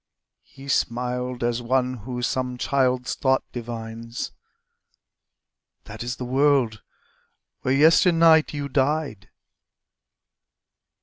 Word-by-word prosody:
He 135 0 -14
smiled 125 -1 -1
as 120 0 0
one 125 +1 0
who 125 +3 -6
some 125 0 -2
child's 130 -1 0
thought 130 -1 +1
divines: 115 0 -6 1.5
"That - - -10
is 120 +1 -3
the 125 - -6
world 130 -4 +2 0.8
where 130 +1 +1
yesternight 165 +1 +5
you 145 -1 -4
died." 135 -6 -1
125 Hz, 95 wpm, -24 LUFS, 120-140 Hz, 1.5 s, yesternight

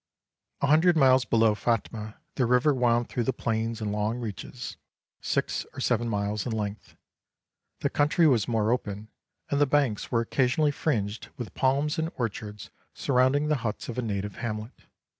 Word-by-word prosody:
A - - +3
hundred 160 +4 +5
miles 130 -3 +5
below 115 -2 +4
Phatmah 110 0 -2 0.2
the 125 - +1
river 125 +5 +4
wound 120 -2 +2
through 125 - -2
the 130 - +2
plains 115 -2 -2
in 105 -1 -1
long 105 +3 -1
reaches, 110 -6 -6 0.5
six - - -1
or - - -7
seven 120 0 +1
miles 105 -1 -1
in - - -2
length; 105 -1 -4 0.9
the - - +1
country 150 +3 +3
was 120 -9 +3
more 110 -2 +1
open, 105 -3 -3 0.4
and 140 0 +2
the 145 - +5
banks 135 -7 +1
were 115 - +3
occasionally 135 +5 +2
fringed 110 -8 -2
with 120 -5 -6
palms 140 +4 +1
and 160 +1 -1
orchards 105 -3 -4 0.2
surrounding 135 +3 +2
the 150 -1 +2
huts 115 -2 -4
of 120 - -5
a - - +1
native 105 -3 -3
hamlet. 110 0 -6
120 Hz, 165 wpm, -27 LUFS, 110-135 Hz, 0.9 s, hundred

